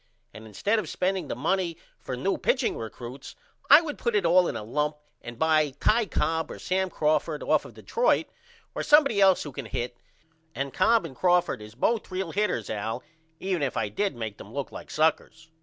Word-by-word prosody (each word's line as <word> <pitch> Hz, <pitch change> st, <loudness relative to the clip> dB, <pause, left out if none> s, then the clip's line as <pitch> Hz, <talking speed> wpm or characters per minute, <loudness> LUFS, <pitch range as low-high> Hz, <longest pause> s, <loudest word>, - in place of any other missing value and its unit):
And 110 Hz, +1 st, -11 dB
instead 205 Hz, -, 0 dB
of 180 Hz, -8 st, -5 dB
spending 190 Hz, 0 st, -1 dB
the -, -, -3 dB
money 180 Hz, -4 st, -1 dB, 0.2 s
for 125 Hz, -, -5 dB
new 195 Hz, +10 st, 0 dB
pitching 255 Hz, -1 st, +1 dB
recruts 120 Hz, +4 st, -8 dB, 0.3 s
I 290 Hz, +3 st, +10 dB
would 300 Hz, -3 st, -6 dB
put 235 Hz, -3 st, 0 dB
it 200 Hz, -4 st, +2 dB
all 175 Hz, +1 st, +5 dB
in -, -, -3 dB
a -, -, -4 dB
lump 150 Hz, +6 st, -1 dB, 0.2 s
and 120 Hz, -1 st, -9 dB
buy 155 Hz, -2 st, +2 dB
Ty 220 Hz, 0 st, +3 dB
Cobb 160 Hz, -1 st, -1 dB
or -, -, -7 dB
Sam 190 Hz, 0 st, -1 dB
Crawford 155 Hz, -1 st, 0 dB
off -, -, +2 dB
of -, -, -12 dB
Detroit -, -, +1 dB, 0.5 s
or -, -, -3 dB
somebody 275 Hz, -9 st, +5 dB
else 190 Hz, -2 st, +5 dB
who 145 Hz, -, -7 dB
can 135 Hz, -3 st, -7 dB
hit 120 Hz, +2 st, -4 dB, 0.6 s
and 140 Hz, 0 st, -3 dB
Cobb 225 Hz, +5 st, +3 dB
and 130 Hz, -, -8 dB
Crawford 175 Hz, -6 st, +2 dB
is 105 Hz, +1 st, -11 dB
both 225 Hz, -, 0 dB
real 185 Hz, -2 st, -3 dB
hitters 190 Hz, -, -1 dB
Al 110 Hz, +1 st, -3 dB, 0.4 s
even 185 Hz, -3 st, -1 dB
if 135 Hz, -3 st, -1 dB
I 110 Hz, -2 st, 0 dB
did 195 Hz, -, -1 dB
make 110 Hz, -3 st, -5 dB
them 100 Hz, -, -11 dB
look 140 Hz, +2 st, -4 dB
like -, -, -9 dB
suckers. 160 Hz, +1 st, 0 dB
160 Hz, 200 wpm, -27 LUFS, 130-195 Hz, 0.6 s, I